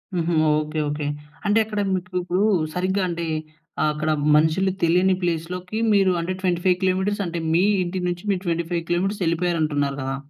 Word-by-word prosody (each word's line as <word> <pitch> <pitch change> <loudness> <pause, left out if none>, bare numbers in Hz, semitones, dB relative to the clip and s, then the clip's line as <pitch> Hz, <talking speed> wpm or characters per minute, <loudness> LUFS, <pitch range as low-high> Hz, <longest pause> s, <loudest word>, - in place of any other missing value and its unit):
హుహు. 170 0 0 0.3
Okay, 155 +1 -4
okay. 150 0 -3 0.4
అంటే, 205 +2 +3
అక్కడ 210 -1 -4
మీకు 185 0 -3
ఇప్పు‌డు 180 +1 -1 0.4
సరిగ్గా 190 +2 0
అంటే 170 0 -3 0.6
ఆహ్, 155 - +3
అక్కడ 155 +1 -2 0.3
మనుషులు 160 +5 +3
తెలియని 180 +3 +3
ప్లేస్‌ 165 -2 -1
లోకి 180 +4 -5 0.2
మీరు 195 -2 +4
అంటే 170 +2 -2
25 180 0 +2
కిలోమీట‌ర్స్ 190 +2 0
అంటే, 170 -1 -3
మీ 170 - +4 0.2
ఇంటి 180 +1 -3
నుంచి 175 0 -3
మీరు 190 -2 0
25 170 0 -1
కిలోమీట‌ర్స్ 195 +4 0
వెళ్ళిపోయారు 170 0 0
అంటున్నారు 145 -2 0
కదా! 135 0 -2
175 Hz, 170 wpm, -23 LUFS, 165-185 Hz, 0.6 s, మీరు